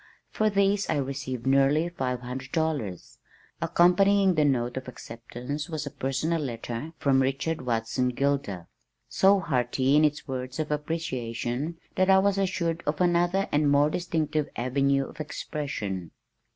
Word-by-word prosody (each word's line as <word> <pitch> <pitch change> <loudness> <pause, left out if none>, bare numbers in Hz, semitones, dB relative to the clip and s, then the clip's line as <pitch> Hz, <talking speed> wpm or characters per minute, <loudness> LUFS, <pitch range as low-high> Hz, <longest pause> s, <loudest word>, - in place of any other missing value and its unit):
For 215 0 +2
these 200 0 +2
I - - +2
received 130 -3 -3
nearly 140 +4 +3
five 130 -7 -3
hundred 130 +1 -6
dollars! 150 - -2 0.4
Accompanying 195 +2 +4
the 155 -2 +2
note 125 -4 +1
of 130 0 -5
acceptance 125 +5 -7
was 155 -2 -3
a 145 - -5
personal 155 +6 -1
letter 120 +3 -5
from 135 -1 +3
Richard 135 +4 -1
Watson 120 +1 0
Gilder, 125 -9 -1 0.4
so 195 +1 +4
hearty 130 -3 +1
in 150 - +5
its 150 -1 0
words 130 -1 -4
of 155 -1 -2
appreciation 145 -2 -3 0.2
that 185 0 +3
I 190 - +7
was 195 0 +2
assured 170 -3 -1
of 150 +1 0
another 175 +2 +2
and 145 0 +3
more 145 +1 +4
distinctive 155 -4 -1
avenue 135 +2 +1
of 150 - -14
expression. 105 - -4
145 Hz, 145 wpm, -27 LUFS, 125-165 Hz, 0.4 s, I